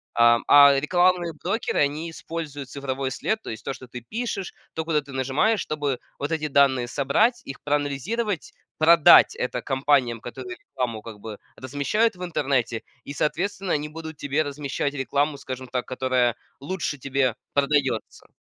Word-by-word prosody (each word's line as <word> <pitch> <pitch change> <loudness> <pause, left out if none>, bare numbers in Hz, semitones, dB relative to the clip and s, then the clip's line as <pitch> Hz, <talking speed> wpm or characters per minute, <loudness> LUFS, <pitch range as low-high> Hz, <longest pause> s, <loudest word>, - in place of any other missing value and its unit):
Ам, 120 0 +5
а 140 -1 +8
рекламные 175 +3 +2
брокеры, 200 +6 -1
они 150 +3 0
используют 155 -4 -6
цифровой 135 -1 -3
след, 220 - -2
то - - -8
есть 110 0 -8
то, - - -3
что 130 - -11
ты 125 0 -8
пишешь, 210 - -4 0.2
то, 160 - -2
куда 160 -2 +1
ты 140 -1 -11
нажимаешь, 135 - +1
чтобы 145 -4 -2 0.2
вот 145 +3 -2
эти 155 -1 -1
данные 135 -4 +3
собрать, 180 - +2
их 135 - -8
проанализировать, 150 - -1 0.3
продать 165 0 +7
это 125 -1 -2
компаниям, 135 -3 +1
которые 365 - -8
рекламу 125 - -4
как 110 -2 -10
бы 110 -2 -7 0.2
размещают 145 - 0
в 180 - -7
интернете, 135 -8 -1 0.2
и, 140 - -6
соответственно, 180 +6 -1
они 150 0 -1
будут 160 -1 -8
тебе 145 +2 0
размещать 145 0 -3
рекламу, 140 +2 0
скажем 130 -1 -7
так, 125 0 -2
которая 130 -2 +1 0.2
лучше 150 0 -3
тебе 130 -2 0 0.2
продается. 145 +1 0
145 Hz, 155 wpm, -24 LUFS, 130-165 Hz, 0.3 s, а